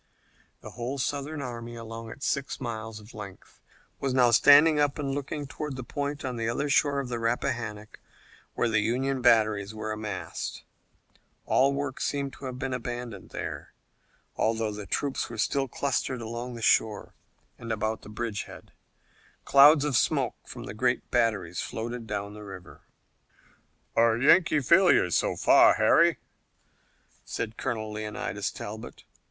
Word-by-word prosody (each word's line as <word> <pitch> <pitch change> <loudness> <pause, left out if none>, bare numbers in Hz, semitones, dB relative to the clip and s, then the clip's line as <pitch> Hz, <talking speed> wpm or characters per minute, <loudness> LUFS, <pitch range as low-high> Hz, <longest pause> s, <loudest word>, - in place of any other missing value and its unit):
The - - -9
whole 125 +3 -4
Southern 145 +2 -3
army, 120 -2 -6
along 115 0 -8
its 140 - -7
six 140 0 -2
miles 110 -3 -5
of 105 +2 -15
length, 100 -3 -11 0.4
was 135 -2 -1
now 125 -2 +5
standing 150 +5 +7
up 145 0 +1
and 140 -2 -2
looking 145 +1 -4
toward 145 0 -5
the 130 - -6
point 145 +3 -4
on 125 -2 -3
the 115 0 -1
other 140 +5 -1
shore 140 0 +3
of 135 - -3
the 120 -1 -3
Rappahannock 115 -2 -3 0.6
where - - +1
the 110 -2 +2
Union 130 +4 0
batteries 110 -3 +3
were 110 0 -4
massed. 105 -3 -5 0.8
All 135 +1 +3
work 140 -1 -3
seemed 140 -1 -2
to - - -10
have 130 -1 -5
been 130 0 -3
abandoned 120 -4 -5
there, - - -6 0.6
although 110 -1 0
the 105 -1 -7
troops 140 +8 -1
were 115 - -8
still 135 +4 0
clustered 130 0 -2
along 120 +2 -5
the 115 - -7
shore 110 -1 +2 0.5
and 115 -1 -6
about 110 0 -2
the - - -12
bridge 105 -2 -4
head. - - -13 0.7
Clouds 145 +2 +7
of 145 -3 0
smoke - - +2
from - - -8
the 100 - -7
great 125 +2 -1
batteries 105 -8 0
floated 120 0 -5
down 100 -1 -4
the 105 - -10
river. 95 -3 -11 1.1
"A 115 -1 +4
Yankee 155 +3 +4
failure 170 - +5
so - - +1
far, - - +6
Harry," - - +4 1.1
said 115 -1 -4
Colonel 110 -4 -3
Leonidas 105 0 -3
Talbot. 110 +2 -8
120 Hz, 155 wpm, -27 LUFS, 110-135 Hz, 1.1 s, standing